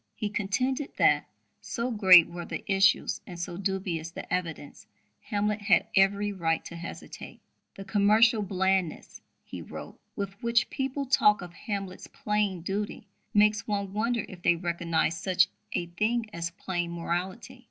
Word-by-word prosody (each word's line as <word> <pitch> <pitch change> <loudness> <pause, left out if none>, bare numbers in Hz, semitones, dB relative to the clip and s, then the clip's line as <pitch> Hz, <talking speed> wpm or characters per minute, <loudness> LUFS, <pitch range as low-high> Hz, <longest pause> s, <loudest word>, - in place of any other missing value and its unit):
He 210 - -3
contended 255 +8 -1
that, - - +3 0.3
so 240 +1 -3
great 190 -6 +8
were 175 0 -7
the - - -5
issues 195 0 +2
and 175 -2 -8
so 175 0 -4
dubious 185 -4 -2
the - - -7
evidence, 165 -5 -4 0.4
Hamlet 210 -1 -1
had 205 -1 +4
every 200 +1 +3
right 165 -4 -1
to 170 - -8
hesitate. 170 0 -9 0.4
"The 195 - -9
commercial 215 +3 +4
blandness," 190 -3 -1 0.2
he - - -8
wrote, - - -9 0.2
"with 200 -1 -5
which 235 0 +2
people 270 +1 -2
talk 210 -7 +4
of 175 -1 -10
Hamlet's 195 0 -5
'plain 210 -4 -1
duty' 205 +4 -4 0.3
makes 210 +1 +3
one 200 -2 -2
wonder 230 +1 0
if 180 -2 -11
they 175 - +4
recognize 170 -1 -1
such 185 -1 +3 0.2
a 175 - -1
thing 215 +7 -1
as 170 0 -3
plain 175 -1 -3
morality. 185 +9 -4
195 Hz, 150 wpm, -28 LUFS, 175-210 Hz, 0.4 s, great